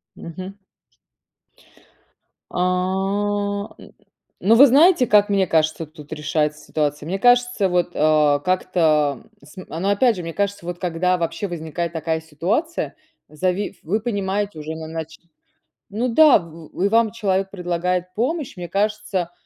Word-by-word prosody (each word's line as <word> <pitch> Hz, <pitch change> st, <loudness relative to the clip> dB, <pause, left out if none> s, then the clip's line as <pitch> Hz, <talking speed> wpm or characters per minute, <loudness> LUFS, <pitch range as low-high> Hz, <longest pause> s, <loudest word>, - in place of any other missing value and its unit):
Мгм. 185 Hz, +4 st, -9 dB, 1.9 s
А, 200 Hz, +3 st, -1 dB
н -, -, -14 dB, 0.5 s
ну 215 Hz, -, +3 dB
вы 275 Hz, +5 st, +9 dB
знаете, 285 Hz, +1 st, +5 dB
как 210 Hz, -1 st, +4 dB
мне 195 Hz, -2 st, +2 dB
кажется, 160 Hz, 0 st, +1 dB
тут 155 Hz, -1 st, -11 dB
решается 150 Hz, 0 st, -2 dB
ситуация? 150 Hz, 0 st, -2 dB
Мне 190 Hz, +3 st, -2 dB
кажется, 245 Hz, -2 st, +3 dB
вот, 175 Hz, -1 st, +1 dB
а, 150 Hz, -1 st, +3 dB
как-то 155 Hz, -5 st, +1 dB, 0.2 s
см 165 Hz, +1 st, -9 dB
но 195 Hz, -, 0 dB
опять 225 Hz, +4 st, +3 dB
же, 180 Hz, -, -5 dB
мне 165 Hz, -1 st, -6 dB
кажется, 200 Hz, -2 st, -2 dB
вот 175 Hz, 0 st, -5 dB
когда 180 Hz, +1 st, 0 dB
вообще 170 Hz, +3 st, -3 dB
возникает 170 Hz, 0 st, -4 dB
такая 160 Hz, 0 st, -2 dB
ситуация. 185 Hz, -, -2 dB, 0.3 s
Зави 185 Hz, +6 st, -2 dB
вы 200 Hz, +7 st, 0 dB
понимаете 205 Hz, -4 st, -2 dB
уже 155 Hz, +1 st, -6 dB
иначе, 160 Hz, 0 st, -7 dB, 0.7 s
ну 225 Hz, +5 st, -1 dB
да, 300 Hz, +2 st, +6 dB
в 165 Hz, -2 st, -12 dB
в -, -, -3 dB
и 200 Hz, -, +3 dB
вам 225 Hz, 0 st, +3 dB
человек 195 Hz, -4 st, -1 dB
предлагает 180 Hz, -1 st, -2 dB
помощь. 265 Hz, -, -2 dB
Мне 175 Hz, -1 st, -6 dB
кажется, 200 Hz, -3 st, -1 dB
185 Hz, 140 wpm, -21 LUFS, 160-205 Hz, 1.9 s, вы